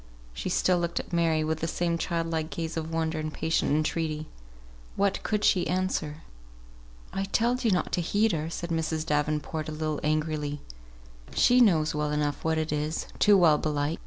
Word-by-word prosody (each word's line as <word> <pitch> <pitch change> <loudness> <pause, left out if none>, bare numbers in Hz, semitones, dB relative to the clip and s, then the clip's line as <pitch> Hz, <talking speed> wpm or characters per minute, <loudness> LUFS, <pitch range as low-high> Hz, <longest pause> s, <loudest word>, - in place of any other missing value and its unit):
She 60 - -4
still 180 -1 +2
looked 170 0 -1
at - - -8
Mary, 165 -2 +2
with 160 0 -1
the 165 - -2
same 170 +1 0
child 170 -1 -1
like 160 -1 -2
gaze 165 -1 -4
of 160 0 -4
wonder 160 -1 -1
and 155 0 -3
patient 160 +1 0
entreaty. 155 0 0 0.7
What 200 -1 +1
could 210 -1 -1
she 180 -3 +3
answer? 175 -4 -2 0.9
"I 195 - -1
telled 240 +5 +1
ye 230 - +3
not 185 -3 0
to 180 - +1
heed 205 +6 +2
her," 160 -1 -2
said 170 +1 -5
Mrs. 160 -1 -1
Davenport, 150 +1 -1
a - - -4
little 155 -1 -2
angrily. 150 -1 -1 0.8
"She 250 +1 +5
knows 160 -9 +4
well 150 0 -1
enough 150 -1 -1
what 160 0 +1
it 155 -1 -1
is, 150 +1 -2
too 205 -1 +6
well, 160 -5 +5
belike. 150 +1 -1
160 Hz, 185 wpm, -27 LUFS, 155-175 Hz, 0.9 s, too